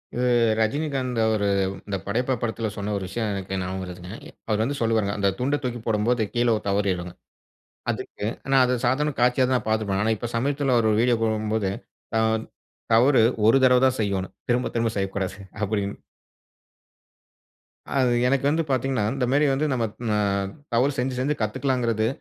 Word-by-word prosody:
இவு 125 +1 +1 0.3
ரஜினிகாந்த் 130 +1 -1
அவரு, 110 -2 +1 0.4
இந்த 100 - -2
படையப்பா 125 +6 0
படத்தில, 115 -1 -2
சொன்ன 105 +1 -2
ஒரு 100 - -4
விஷய, 110 +4 -3
எனக்கு 95 -1 -3
ஞாபக 95 +1 -3
வருதுங்க. 90 0 -8 0.4
அவர் 110 -1 +1
வந்து 140 +5 -1
சொல்லுவாருங்க. 110 -3 +1
அந்த 100 -1 +3
துண்ட 140 +4 +1
தூக்கி 120 -1 -3
போடம்போது, 115 +2 +1
கீழ 120 0 +1
ஒரு - - -4
தவறிடுங்க. 95 -3 -1 0.8
அதுக்கு 105 - -4 0.2
ஆனா, 135 0 +3
அது 125 - +1
சாதாரண 150 +4 +1
காட்சியாதா 125 +1 +3
பார்த்துப்பே. 110 -3 0
ஆனா 110 - +2
இப்ப, 120 +3 -5
சமீபத்தில 135 +1 +1
அவர் 115 -2 +3
ஒரு 105 - +1
வீடியோ 120 -1 +3
போடம்போது, 110 -2 0 0.4
"த - - +1 0.8
தவறு 125 +2 +5 0.2
ஒரு 115 +4 +6
தடவ 125 -1 +6
தான் 130 0 +1
செய்யணும். 100 -3 -2
திரும்ப 125 +1 +1
திரும்ப 115 -1 0
செய்யக்கூடாது." 95 0 -2 0.2
அப்படினு. 100 -1 -1 2.0
அது, 130 -2 +3 0.2
எனக்கு 135 +1 +1
வந்து 165 +2 +1
பாத்தீங்கனா, 130 -3 0
இந்த 135 -2 0
மேரி 145 +2 +3
வந்து, 140 +3 0
நம்ம 120 -3 +1 0.3
அ - - +2 0.6
தவறு 125 +5 +3
செஞ்சு 125 0 -1
செஞ்சு 145 +4 0
கத்துக்குளாங்குறது, 115 0 0
115 Hz, 155 wpm, -24 LUFS, 105-130 Hz, 2.0 s, ஒரு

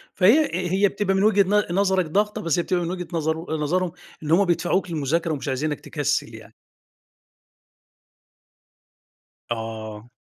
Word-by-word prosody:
فهي 250 +12 +5
هي 185 +3 +2
بتبقى 195 0 -1
من 195 - +2
وجهة 205 -2 +5 0.3
ن - - -1
نظرك 190 -2 +2
ضغطة، 210 +6 0
بس 165 0 0
هي - - +1
بتبقى 180 -1 0
من 170 - -3
وجهة 180 -1 -5
نظر 160 0 -2
نظرهم 175 +4 0 0.3
إن 150 - -3
هُم 195 +4 +5
بيدفعوك 175 +2 0
للمذاكرة 160 +2 0
ومش 145 0 -5
عايزينك 145 +3 -1
تكسل 145 -2 -2
يعني. - - -13 3.0
آه. 110 -1 -5
170 Hz, 140 wpm, -23 LUFS, 150-190 Hz, 3.0 s, فهي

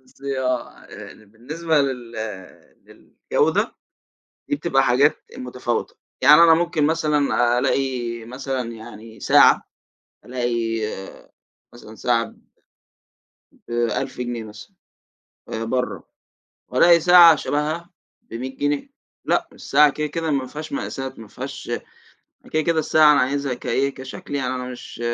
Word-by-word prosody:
بُصّي 135 +1 -6
آه، 125 -1 -3 0.4
بالنسبة 150 +10 -2
لل 125 -4 -4
لل 105 -4 -10 0.3
للجودة - - +2 0.8
دي 145 - +1
بتبقى 140 -3 +1
حاجات 135 +4 +3
متفاوتة، 125 -1 -3 0.3
يعني 150 +5 +8
أنا 165 - +7
ممكن 165 -2 +1
مثلًا 145 -6 +2
ألاقي 120 -4 -1
مثلًا 130 0 -4
يعني 110 -1 -11
ساعة، - - +5 0.6
ألاقي 120 -1 -2 1.2
مثلًا 110 -2 -13
ساعة 115 0 +1
ب - - -16 1.3
ب1000 120 +1 -2
جنيه 120 -2 -4
مثلًا 105 -1 -12 0.8
آآ، 115 - -4
برّه 125 +2 -2 0.6
وألاقي 170 -1 +5
ساعة 175 -1 +8
شبهَهَا 155 +4 -2 0.3
ب100 130 +3 -7
جنيه. 145 - -1 0.4
لأ - - +1
الساعة 150 +1 +4
كده، 150 +2 -3
كده 160 +1 -3
ما 135 -2 -1
فيهاش 155 +4 -8
مقاسات 135 -2 -5
ما 110 - -10
فيهاش - - -7 0.8
كده، 155 - +1
كده 165 0 +1
الساعة 155 -1 +5
أنا 145 - +3
عايزها 140 +1 -1
كإيه 135 +2 -1
كشكل 135 +2 -8
يعني 130 -2 -1
أنا 125 - -4
مش 125 -1 -10
130 Hz, 120 wpm, -22 LUFS, 120-150 Hz, 1.3 s, يعني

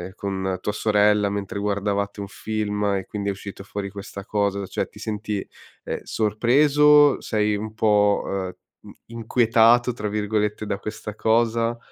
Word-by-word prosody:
con 95 -2 -3
tua - - -1
sorella 105 -1 +3
mentre 100 -1 -4
guardavate 100 0 -1
un 100 - -5
film 105 0 -3
e 95 - -5
quindi 100 -1 -3
è - - +1
uscito 100 0 -8
fuori 100 0 -5
questa 100 0 -9
cosa, 100 -1 -1
cioè - - -2
ti - - -15
senti, 105 -2 -4 0.4
ehm, - - -4
sorpreso, 145 +7 +4
sei 105 -1 0
un 110 +1 -5
po', 105 -2 +3
ehm, 95 -2 -3 0.3
mhmm, - - -13 0.2
inquietato, 115 +1 +3
tra 105 -2 -4
virgolette, 105 0 -1
da 100 - -2
questa 105 0 -7
cosa? 115 +1 +1
105 Hz, 150 wpm, -23 LUFS, 100-110 Hz, 0.4 s, sorpreso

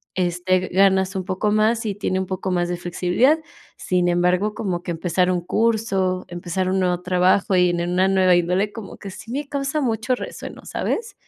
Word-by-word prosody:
este, 180 +1 0
ganas 190 0 +3
un 190 - -2
poco 195 +2 -1
más 220 +2 +2
y 205 -3 -2
tiene 190 -2 -1
un 190 - -2
poco 185 0 -3
más 175 -1 +1
de 175 - -2
flexibilidad. 180 - +1 0.4
Sin 180 -1 0
embargo, 180 +4 +1
como 180 -5 -3
que 175 - -4
empezar 180 +2 0
un 180 - +1
curso, 195 -2 0
empezar 175 +1 -3
un 190 0 +1
nuevo 180 -1 0
trabajo 185 +2 +2
y 180 -1 +4
en 175 0 -1
una 185 +2 +2
nueva 185 -2 +4
índole, 180 +4 +1
como 220 -4 -9
que 195 - -8
sí 225 +4 -10
me 285 +2 -3
causa 280 +1 -2
mucho 230 -1 0
resueno, - - -8
¿sabes? 460 +2 -3
185 Hz, 190 wpm, -22 LUFS, 180-210 Hz, 0.4 s, y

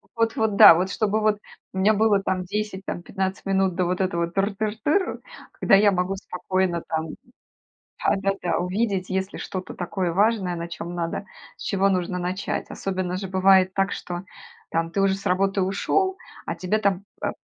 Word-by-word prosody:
Вот 230 -1 +1
вот, 220 -2 +1
да. - - +11
Вот 180 +3 0
чтобы 215 0 0
вот 215 -1 +2 0.3
у - - -6
меня 200 +3 +4
было 210 -1 +3
там 190 -1 -1
10, 205 0 -4
там - - -4
15 190 +1 -3
минут 190 -2 +1
до 185 - +1
вот 180 +2 -1
этого 170 -2 0
тыр 195 +4 0
тыр 215 +1 -2
тыр, 370 +6 +1 0.3
когда - - +4
я 205 +1 +5
могу 185 +1 0
спокойно 185 -2 -2
там, 160 0 -2 1.0
да - - +3
да 195 0 0
да, 175 - 0
увидеть, 190 +1 -1
если 190 +1 -2
что-то 185 -1 -6
такое 180 -1 -2
важное, 200 -1 +2
на 170 0 -5
чем 170 +1 -6
надо, 170 +3 -3 0.3
с - - -11
чего 195 0 +2
нужно 180 -1 -1
начать. 185 +3 -3
Особенно 185 -2 -3
же 190 0 -5
бывает 190 0 +4
так, 195 0 +1
что, 175 0 -5 0.5
там, 165 0 -1
ты 195 - -1
уже 195 -1 +3
с 195 - -8
работы 195 +2 +2
ушел, 375 - 0 0.3
а - - -2
тебе 185 +4 -1
там, 200 -2 0 0.2
э, - - +1
190 Hz, 190 wpm, -24 LUFS, 180-200 Hz, 1.0 s, да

